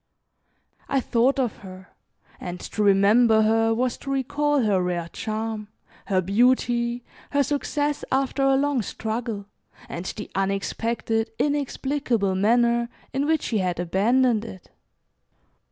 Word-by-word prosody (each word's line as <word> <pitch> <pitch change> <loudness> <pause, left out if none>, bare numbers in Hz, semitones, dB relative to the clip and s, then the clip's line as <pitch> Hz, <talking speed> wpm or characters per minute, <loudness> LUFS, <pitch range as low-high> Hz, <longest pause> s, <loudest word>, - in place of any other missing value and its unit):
I 275 - +2
thought 250 +2 +2
of 250 -5 -1
her, 185 -2 -12 0.5
and 180 0 -6
to 215 - -5
remember 215 +3 +5
her 225 +1 +3
was 245 +2 0
to 275 - -8
recall 285 +1 +1
her 200 -4 +2
rare 175 -2 -2
charm, 220 0 -4 0.4
her 190 -3 +2
beauty, 240 +4 +1 0.3
her 285 0 +2
success, 290 +1 -1
after 270 +1 0
a 270 0 +4
long 280 -2 +1
struggle, 220 -1 -4 0.4
and 170 +2 -6
the 210 - -6
unexpected, 225 +3 -1
inexplicable 275 -7 0
manner 235 +4 +2 0.2
in 275 +2 0
which 315 -1 +1
she 220 - 0
had 180 -2 -1
abandoned 220 +6 +2
it. 190 -5 -11
230 Hz, 125 wpm, -24 LUFS, 200-265 Hz, 0.5 s, remember